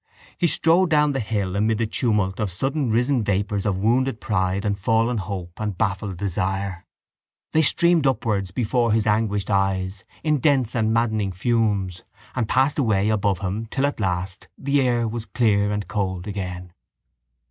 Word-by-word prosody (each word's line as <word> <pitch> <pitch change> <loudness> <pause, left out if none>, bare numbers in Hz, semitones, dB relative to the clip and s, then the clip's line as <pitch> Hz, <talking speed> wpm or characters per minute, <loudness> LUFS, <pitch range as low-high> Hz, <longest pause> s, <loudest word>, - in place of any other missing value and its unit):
He 175 - +1
strode 170 +3 +4
down 150 -2 +3
the 135 - -2
hill 105 -5 -2
amid 110 +2 +1
the 115 - 0
tumult 105 -5 0
of 105 -2 0
suddenrisen 125 - +1
vapours 100 +1 -1
of 95 -2 0
wounded 120 +4 +1
pride 95 -1 -1
and 100 -1 +1
fallen 115 +4 +1
hope 90 -3 -6
and 105 -4 -3
baffled 100 -2 -2
desire. 95 -1 -3 0.6
They 160 - +3
streamed 165 0 +4
upwards 110 -7 0
before 115 +3 0
his 110 -1 +2
anguished 105 -2 0
eyes 95 0 0 0.2
in 150 -2 +1
dense 130 -4 +2
and 110 -2 +1
maddening 110 -3 0
fumes 100 -3 0 0.3
and 120 -4 -2
passed 135 +3 +2
away 110 -5 +2
above 100 -3 0
him 100 +4 -3
till 135 +5 -1
at 145 - -2
last 95 0 -3
the 140 +1 +1
air 120 -3 +1
was 115 0 -5
clear 105 -4 +2
and 105 -3 -3
cold 95 -3 -2
again. 90 -3 -6
105 Hz, 160 wpm, -23 LUFS, 95-120 Hz, 0.6 s, strode